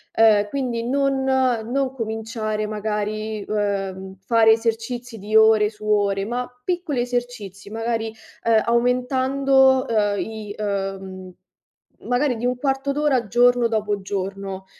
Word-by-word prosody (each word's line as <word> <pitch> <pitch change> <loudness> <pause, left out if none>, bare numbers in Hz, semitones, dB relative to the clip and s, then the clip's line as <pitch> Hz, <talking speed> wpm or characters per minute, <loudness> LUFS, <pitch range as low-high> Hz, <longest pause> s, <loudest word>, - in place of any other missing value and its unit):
uhm, 215 -2 +5
quindi 245 -2 -2
non 270 +2 0
non 260 0 0
cominciare 220 -2 -3
magari, 215 0 -3
uhm, 195 -2 -2
fare 225 0 +5
esercizi 230 +1 -3
di 210 +2 -4
ore 220 -1 +6
su 215 0 -13
ore 200 -2 +1
ma 245 +3 -3 0.2
piccoli 350 -8 -1
esercizi 240 -6 -4
magari, 225 +1 -2 0.4
uhm, 225 -1 +4
aumentando, 260 +2 +3
uhm, 205 -3 +1
i 215 -2 -6
uhm, 195 -2 -4 0.7
magari 250 +1 +1
di 235 +2 -2
un 250 0 -1
quarto 270 +1 -1
d'ora, 275 -5 +1
giorno 245 +2 +4
dopo 210 -3 -1
giorno, 195 0 -5
225 Hz, 120 wpm, -22 LUFS, 210-250 Hz, 0.7 s, ore